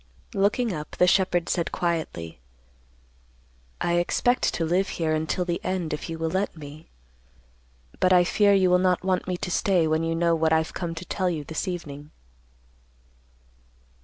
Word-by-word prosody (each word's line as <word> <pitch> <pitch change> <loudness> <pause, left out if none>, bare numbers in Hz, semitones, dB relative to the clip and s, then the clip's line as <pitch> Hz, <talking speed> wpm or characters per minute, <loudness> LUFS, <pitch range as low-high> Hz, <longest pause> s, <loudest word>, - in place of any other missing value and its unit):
Looking 205 +3 +1
up, 150 -2 -7
the 180 - +5
shepherd 180 -2 +2
said 170 -2 -1
quietly, 160 - -3 1.4
"I 175 0 +1
expect 245 +8 +1
to 165 - -1
live 180 +4 +1
here 160 -2 0
until 160 +3 -1
the 175 -1 -3
end 180 -4 -2
if 150 - -5
you 165 - -4
will 160 0 -2
let 190 -2 -2
me. 150 +1 -11 1.1
But 185 - +3
I 180 -1 +6
fear 200 +3 +3
you 185 -2 +3
will 180 - +5
not 180 -1 +1
want 185 -1 0
me 180 -1 -2
to 180 - -4
stay 185 -2 +2
when 155 +1 +1
you 165 0 -1
know 170 0 +2
what 160 -1 +2
I've 160 0 +1
come 170 -2 -4
to 165 +3 -7
tell 185 0 -1
you 160 -4 -3
this 160 +6 -4
evening." 150 -5 -6
175 Hz, 170 wpm, -25 LUFS, 160-185 Hz, 1.4 s, I